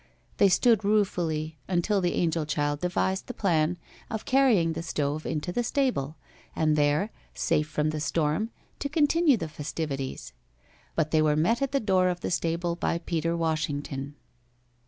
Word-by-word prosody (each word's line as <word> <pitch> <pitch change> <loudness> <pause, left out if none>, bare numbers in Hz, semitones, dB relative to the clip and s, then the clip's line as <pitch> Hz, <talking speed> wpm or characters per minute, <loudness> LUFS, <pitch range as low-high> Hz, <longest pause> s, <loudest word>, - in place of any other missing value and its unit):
They 200 - +5
stood 225 +2 +4
ruefully 165 -7 0
until 190 +3 +1
the 175 -1 0
angel 165 -2 0
child 145 -1 0
devised 190 +1 -1
the 250 - -6
plan 170 -3 +1 0.3
of 220 -1 -4
carrying 240 -12 +3
the 165 - -4
stove 150 -2 -2
into 160 +2 -2
the 240 - 0
stable, 230 - 0 0.4
and 155 -1 +2
there, 150 +8 +2 0.2
safe 150 0 +1
from 150 0 0
the 155 - -3
storm, 155 +7 0 0.3
to 280 - -2
continue 300 -1 +3
the 165 - -4
festivities. 150 - -5 0.6
But 155 -2 0
they 155 - +4
were 150 -1 +3
met 180 - +2
at 275 - 0
the 280 - +2
door 190 -5 +2
of 175 -1 -3
the - - -3
stable 170 0 0
by 170 - -1
Peter 165 0 -1
Washington. 145 -3 -2
165 Hz, 160 wpm, -27 LUFS, 155-200 Hz, 0.6 s, They